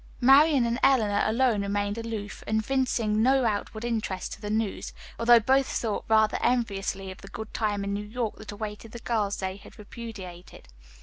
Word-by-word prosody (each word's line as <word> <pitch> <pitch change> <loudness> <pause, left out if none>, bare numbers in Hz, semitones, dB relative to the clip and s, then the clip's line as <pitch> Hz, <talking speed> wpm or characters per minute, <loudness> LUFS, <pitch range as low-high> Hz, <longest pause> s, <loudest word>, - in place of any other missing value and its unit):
Marian 275 +1 +6
and 235 +2 -1
Eleanor 220 -7 +3
alone 230 -1 +2
remained 205 0 -1
aloof, 225 -3 -6
evincing 220 -1 0
no 260 +1 +3
outward 220 +1 -2
interest 215 -6 -3
in - - -21
the 205 - -5
news, 215 -1 -2 0.3
although 235 0 +7
both 265 +4 +2
thought 220 -3 -2
rather 220 -1 +3
enviously 195 -5 -1
of 185 - -11
the 195 - -11
good 220 +2 -8
time 205 -2 -1
in 200 0 -2
New 205 +1 -3
York 225 0 -3
that 215 -1 -9
awaited 210 +1 -7
the 235 - -7
girls 210 -4 -1
they 190 0 -4
had 200 - -15
repudiated. 195 - -10
220 Hz, 175 wpm, -27 LUFS, 205-235 Hz, 0.3 s, although